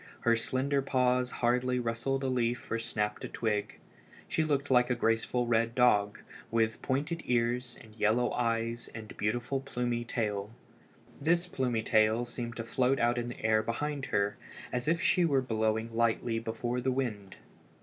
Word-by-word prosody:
Her 115 Hz, 0 st, +4 dB
slender 130 Hz, +4 st, 0 dB
paws 125 Hz, -1 st, +2 dB
hardly 125 Hz, +1 st, +1 dB
rustled 125 Hz, +3 st, -1 dB
a -, -, 0 dB
leaf 120 Hz, -2 st, -1 dB
or 115 Hz, -, 0 dB
snapped 105 Hz, -2 st, -2 dB
a -, -, -3 dB
twig. 105 Hz, -2 st, -2 dB, 0.5 s
She 160 Hz, -, +1 dB
looked 140 Hz, -3 st, 0 dB
like 125 Hz, -1 st, +5 dB
a 125 Hz, -, +2 dB
graceful 115 Hz, +2 st, +1 dB
red 115 Hz, 0 st, +1 dB
dog, 105 Hz, -5 st, +3 dB, 0.3 s
with 115 Hz, -1 st, +1 dB
pointed 150 Hz, +5 st, -1 dB
ears 120 Hz, 0 st, 0 dB
and 110 Hz, -2 st, -15 dB
yellow 110 Hz, +3 st, +2 dB
eyes 115 Hz, 0 st, -1 dB
and 110 Hz, -2 st, -8 dB
beautiful 120 Hz, +5 st, -1 dB
plumy 120 Hz, -3 st, -2 dB
tail. 105 Hz, -4 st, -2 dB, 0.7 s
This 170 Hz, +4 st, +2 dB
plumy 125 Hz, -9 st, -1 dB
tail 110 Hz, +2 st, +3 dB
seemed 120 Hz, -1 st, -5 dB
to 115 Hz, -, -4 dB
float 130 Hz, +3 st, +1 dB
out 120 Hz, +1 st, +2 dB
in 120 Hz, -, -3 dB
the 120 Hz, -, -7 dB
air 110 Hz, 0 st, +4 dB
behind 140 Hz, +5 st, -3 dB
her, 100 Hz, 0 st, 0 dB, 0.4 s
as 125 Hz, +1 st, -1 dB
if 165 Hz, +2 st, +2 dB
she 180 Hz, -, +4 dB
were 145 Hz, -5 st, +3 dB
blowing 110 Hz, -2 st, -1 dB
lightly 115 Hz, 0 st, +1 dB
before 115 Hz, +2 st, -3 dB
the 130 Hz, +1 st, +1 dB
wind. 110 Hz, -7 st, -3 dB
120 Hz, 165 wpm, -31 LUFS, 115-130 Hz, 0.7 s, like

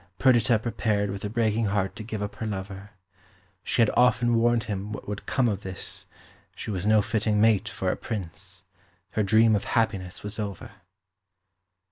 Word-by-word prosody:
Perdita 120 Hz, +1 st, +4 dB
prepared 105 Hz, -2 st, -1 dB
with 100 Hz, 0 st, -6 dB
a 105 Hz, -, -2 dB
breaking 110 Hz, 0 st, +1 dB
heart 100 Hz, -1 st, 0 dB
to 110 Hz, -, -7 dB
give 110 Hz, -1 st, -4 dB
up 100 Hz, -, -6 dB
her 110 Hz, -, -3 dB
lover. 100 Hz, 0 st, -6 dB, 0.7 s
She 115 Hz, -, +2 dB
had 110 Hz, -, +2 dB
often 120 Hz, -1 st, +4 dB
warned 115 Hz, 0 st, +3 dB
him 105 Hz, -1 st, -4 dB
what 105 Hz, -, -7 dB
would 105 Hz, 0 st, -5 dB
come 130 Hz, -3 st, +2 dB
of 100 Hz, -3 st, -1 dB
this; 95 Hz, -1 st, -6 dB, 0.5 s
she -, -, -5 dB
was 95 Hz, 0 st, -2 dB
no 110 Hz, -1 st, +5 dB
fitting 110 Hz, -2 st, +1 dB
mate 110 Hz, -2 st, +3 dB
for -, -, -1 dB
a -, -, -1 dB
Prince. 95 Hz, -2 st, -6 dB, 0.5 s
Her 110 Hz, -, 0 dB
dream 110 Hz, +2 st, +5 dB
of 100 Hz, -, -2 dB
happiness 100 Hz, -6 st, -1 dB
was 105 Hz, +2 st, -4 dB
over. 100 Hz, -2 st, -5 dB
105 Hz, 175 wpm, -26 LUFS, 100-115 Hz, 0.7 s, no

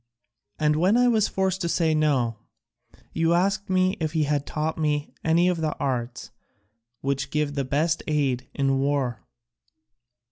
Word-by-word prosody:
And 150 Hz, 0 st, +2 dB
when 185 Hz, +8 st, +3 dB
I 245 Hz, 0 st, +4 dB
was 220 Hz, -4 st, +3 dB
forced 190 Hz, 0 st, -1 dB
to 170 Hz, -, -1 dB
say 165 Hz, -2 st, +2 dB
no, 135 Hz, -7 st, +1 dB, 0.8 s
you 165 Hz, +1 st, +2 dB
asked 195 Hz, +3 st, 0 dB
me 185 Hz, 0 st, +2 dB
if 155 Hz, -1 st, -2 dB
he 160 Hz, -2 st, +2 dB
had 145 Hz, -1 st, -1 dB
taught 155 Hz, +1 st, -2 dB
me 150 Hz, -1 st, -1 dB
any 165 Hz, +2 st, +3 dB
of 175 Hz, -2 st, 0 dB
the 155 Hz, -1 st, -2 dB
arts 125 Hz, -2 st, -3 dB, 0.7 s
which 140 Hz, 0 st, -2 dB
give 150 Hz, 0 st, -1 dB
the 140 Hz, -1 st, -1 dB
best 155 Hz, +5 st, 0 dB
aid 135 Hz, -5 st, 0 dB
in 135 Hz, -1 st, +1 dB
war. 135 Hz, -4 st, -1 dB
150 Hz, 155 wpm, -25 LUFS, 140-170 Hz, 0.8 s, I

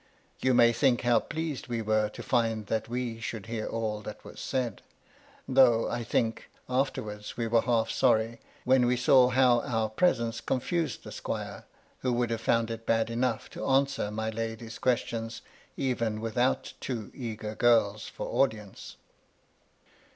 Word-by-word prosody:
You 130 Hz, -1 st, +2 dB
may 120 Hz, -1 st, +6 dB
think 125 Hz, 0 st, +2 dB
how 120 Hz, -1 st, +4 dB
pleased 155 Hz, -6 st, -4 dB
we 115 Hz, -2 st, -2 dB
were 110 Hz, 0 st, +2 dB
to -, -, -9 dB
find 115 Hz, -3 st, +1 dB
that 110 Hz, +1 st, -2 dB
we 120 Hz, -2 st, -3 dB
should 110 Hz, -2 st, -5 dB
hear 115 Hz, -1 st, -4 dB
all 110 Hz, -2 st, -2 dB
that 105 Hz, 0 st, -9 dB
was -, -, -10 dB
said; 125 Hz, -5 st, -2 dB, 0.7 s
though, 130 Hz, -4 st, +5 dB
I 120 Hz, 0 st, -2 dB
think, 115 Hz, 0 st, -1 dB, 0.2 s
afterwards 110 Hz, -5 st, -2 dB
we 115 Hz, -, -1 dB
were 115 Hz, 0 st, +3 dB
half 115 Hz, -2 st, +1 dB
sorry 115 Hz, -2 st, +2 dB, 0.2 s
when 130 Hz, -1 st, +4 dB
we 125 Hz, 0 st, +2 dB
saw 125 Hz, 0 st, +5 dB
how 125 Hz, -2 st, +4 dB
our 110 Hz, -2 st, -1 dB
presence 115 Hz, -3 st, +1 dB
confused 155 Hz, +2 st, -1 dB
the -, -, -9 dB
squire, -, -, -5 dB, 0.3 s
who 130 Hz, -, 0 dB
would 120 Hz, -1 st, 0 dB
have 115 Hz, -1 st, -2 dB
found 115 Hz, 0 st, +1 dB
it 115 Hz, 0 st, -7 dB
bad 115 Hz, 0 st, +2 dB
enough 120 Hz, 0 st, -1 dB
to -, -, -7 dB
answer 135 Hz, -4 st, +2 dB
my 110 Hz, +1 st, -3 dB
lady's 115 Hz, 0 st, -5 dB
questions, 115 Hz, -2 st, -1 dB, 0.3 s
even 115 Hz, -5 st, -1 dB
without 120 Hz, +3 st, 0 dB
two 115 Hz, -5 st, -4 dB
eager 110 Hz, -4 st, -5 dB
girls 110 Hz, -3 st, +3 dB
for -, -, -6 dB
audience. 110 Hz, -7 st, -1 dB
115 Hz, 160 wpm, -29 LUFS, 110-125 Hz, 0.7 s, may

